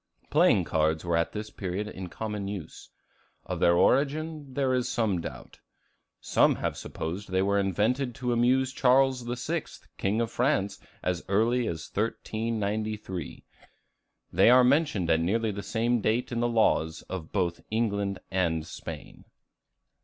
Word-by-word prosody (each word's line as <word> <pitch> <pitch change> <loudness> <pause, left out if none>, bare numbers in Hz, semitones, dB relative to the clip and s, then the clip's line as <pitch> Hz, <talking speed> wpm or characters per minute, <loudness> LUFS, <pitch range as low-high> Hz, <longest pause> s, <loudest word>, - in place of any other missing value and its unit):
Playing - - +5
cards 80 +1 0
were 85 -1 +1
at 85 0 +1
this 105 0 -6
period 95 +2 -4
in 95 -3 -7
common 105 0 -4
use. 100 -6 -7 0.6
Of - - -4
their 85 - +4
origin, 145 - +1
there 135 -2 +1
is 125 -1 0
some 105 -7 0
doubt. - - -9 0.6
Some - - +3
have - - -2
supposed 90 +6 -5
they 95 +1 +1
were 100 +1 +2
invented 115 +7 0
to 125 -3 -1
amuse 130 +2 +2
Charles 130 -1 +3
VI., 125 +7 -3 0.3
King 100 +3 0
of 115 -1 -1
France, 120 -6 0 0.2
as 90 -1 -1
early 115 +4 +2
as 80 -1 -4
1393. 110 -4 -3 0.9
They 95 +6 +6
are 125 +1 +7
mentioned 135 - +2
at 80 - +4
nearly 110 +6 +1
the 100 0 -5
same 115 +2 0
date 115 +5 0
in 120 - -1
the 120 - +2
laws 80 -8 +1
of 85 -4 -7
both 90 -4 -1
England 100 -3 0
and 85 -4 0
Spain. - - -9
110 Hz, 145 wpm, -28 LUFS, 95-125 Hz, 0.9 s, are